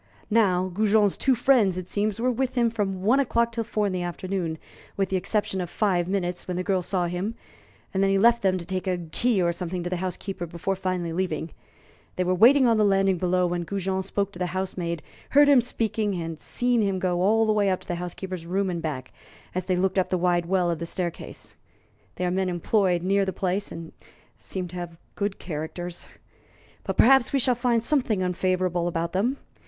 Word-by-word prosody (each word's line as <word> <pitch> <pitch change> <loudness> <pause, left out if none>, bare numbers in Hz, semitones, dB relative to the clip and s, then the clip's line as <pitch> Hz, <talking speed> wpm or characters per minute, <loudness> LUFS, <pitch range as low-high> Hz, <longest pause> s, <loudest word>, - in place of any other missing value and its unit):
Now, 185 -5 +3
Goujon's 210 0 +3
two 265 -1 +2
friends, 235 -7 +3
it 180 -1 -5
seems, 210 +1 -1
were 250 +2 +2
with 255 +1 -2
him 235 -2 +2
from 195 -4 -2
one 240 +7 +4
o'clock 235 -3 +1
till 230 0 -2
four 215 -2 -1
in 195 - -1
the 180 - -2
afternoon, 175 -1 -3 0.4
with 195 -2 0
the 190 - -1
exception 195 0 -1
of 175 - -4
five 180 -5 +1
minutes 180 -2 -2
when 180 -1 -3
the 185 - -1
girl 190 -1 +1
saw 180 0 -1
him, 180 +6 -3 0.6
and 190 - +1
then 195 - +3
he 195 - +3
left 235 +3 +4
them 190 -1 +2
to 170 - -7
take 185 +2 -3
a 180 -1 +1
key 190 +7 0
or 170 0 +1
something 175 0 -4
to 175 - -4
the 180 - 0
housekeeper 185 -1 -4
before 170 +4 -2
finally 185 -3 -2
leaving. 165 -3 -2 0.6
They 185 - 0
were 180 +1 +1
waiting 255 +8 +6
on 230 -2 +4
the 215 - +4
landing 195 -2 +3
below 180 0 +2
when 175 0 -1
Goujon 190 +1 -2
spoke 200 +1 -2
to 175 - -11
the 180 - 0
housemaid, 175 -3 -3 0.3
heard 290 +1 +6
him 280 -3 +6
speaking, 220 -4 -1
and 165 -2 -3
had 160 - -9
seen 245 -1 +1
him 195 -2 0
go 180 -1 0
all 220 +4 +4
the 215 - +2
way 205 -2 +2
up 185 - 0
to - - -15
the - - -2
housekeeper's 180 -1 -6
room 190 +1 0
and 170 -1 -3
back, 140 -5 -5 0.4
as 185 0 -2
they 185 -1 0
looked 190 +1 +1
up 185 - 0
the 185 - +1
wide 175 -1 +1
well 180 -2 +2
of 170 - -3
the 170 - -4
staircase. 175 -1 -5 0.6
They 180 - -2
are 180 - 0
men 190 0 0
employed 180 0 +1
near 195 +2 +2
the 190 -1 -2
place, 195 +1 -2
and 165 -1 -8 0.4
seem 185 -2 -5
to 180 - -8
have 170 -1 -6 0.2
good 200 -1 -2
characters. 170 +2 -6 0.8
But - - -3
perhaps 265 0 +5
we 280 - +2
shall 255 -1 +3
find 240 -1 +1
something 235 -8 +1
unfavorable 180 -1 0
about 170 0 -2
them. 235 +9 +1
190 Hz, 220 wpm, -25 LUFS, 175-210 Hz, 0.8 s, waiting